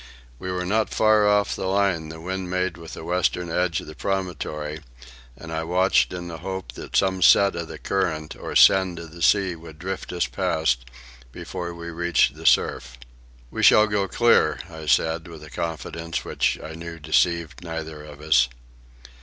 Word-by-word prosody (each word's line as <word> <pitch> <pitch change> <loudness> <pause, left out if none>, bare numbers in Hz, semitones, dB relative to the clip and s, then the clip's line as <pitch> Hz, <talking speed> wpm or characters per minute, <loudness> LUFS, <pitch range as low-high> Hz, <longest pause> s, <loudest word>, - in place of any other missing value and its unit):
We 95 - -4
were 90 0 -2
not 110 +4 +1
far 110 -1 +4
off 105 -1 +2
the - - -3
line 95 -5 +1
the 80 0 -9
wind 95 +2 -4
made 90 -1 -1
with 85 -1 -10
the - - -8
western 90 0 0
edge 90 +1 0
of - - -11
the 75 - -9
promontory, 80 -5 -3 0.6
and 80 - -9
I 80 0 -2
watched 90 +3 +2
in 90 -1 -6
the 80 -2 -7
hope 95 -8 -5
that - - -9
some 95 -1 +2
set 100 +1 +6
of 85 -1 -4
the - - -8
current 80 -6 -2
or - - -7
send 95 -3 +5
of 85 -1 -9
the 85 +1 -12
sea 95 0 +3
would 80 -2 -12
drift 95 +3 -5
us 90 - 0
past 60 -6 0 0.5
before 85 +6 -6
we 85 0 -7
reached 85 +1 +2
the - - -4
surf. 60 -1 +2 0.5
"We - - -4
shall 105 - +7
go 105 -2 0
clear," 120 +4 +3
I 80 -1 -9
said, 80 +5 +1
with 80 -2 -11
a 75 - -12
confidence 80 +2 -4
which - - 0
I 80 - -7
knew 85 +1 -8
deceived 85 +1 0
neither 80 -2 -6
of 75 -1 -12
us. 65 -5 +4
85 Hz, 185 wpm, -24 LUFS, 80-95 Hz, 0.6 s, shall